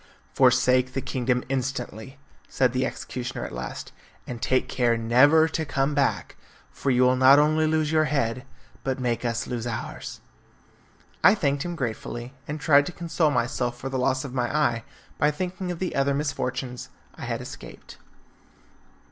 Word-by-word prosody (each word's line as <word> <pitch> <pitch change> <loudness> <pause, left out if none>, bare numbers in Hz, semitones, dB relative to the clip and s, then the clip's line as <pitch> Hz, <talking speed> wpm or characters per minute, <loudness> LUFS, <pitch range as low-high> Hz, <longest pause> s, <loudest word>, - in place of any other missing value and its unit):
"Forsake 125 0 +3
the 135 - -1
kingdom 125 -1 -1
instantly," 130 -2 -4 0.3
said 130 -2 +1
the 130 +1 +1
executioner 125 0 -5
at - - -7
last, 60 +1 -6 0.3
"and 120 -2 -7
take 130 +3 +1
care 120 -2 +1
never 135 +8 +5
to 160 - -2
come 140 -1 0
back, 140 -1 0 0.3
for 140 - -3
you 125 -1 +4
will 125 0 +4
not 130 +2 +7
only 155 +1 +3
lose 155 -1 +1
your 155 -1 +3
head, 130 -5 -1 0.4
but 135 -1 -2
make 120 -2 -1
us 115 -1 -1
lose 120 -1 -4
ours." 115 -2 -6 1.0
I 200 - +7
thanked 140 -8 0
him 175 -1 -4
gratefully, 120 -1 -5
and 150 +1 -4
tried 145 -2 +4
to - - -4
console 170 -2 0
myself 120 -2 -1
for 135 - -5
the 130 -1 -2
loss 130 +1 +1
of 130 - -7
my 125 -2 -1
eye 140 -7 +1 0.4
by 150 - +4
thinking 180 +4 -4
of 175 - -4
the 185 +1 -3
other 140 0 +2
misfortunes 130 -3 -3 0.2
I - - -8
had - - -2
escaped. - - -11
130 Hz, 165 wpm, -25 LUFS, 125-150 Hz, 1.0 s, not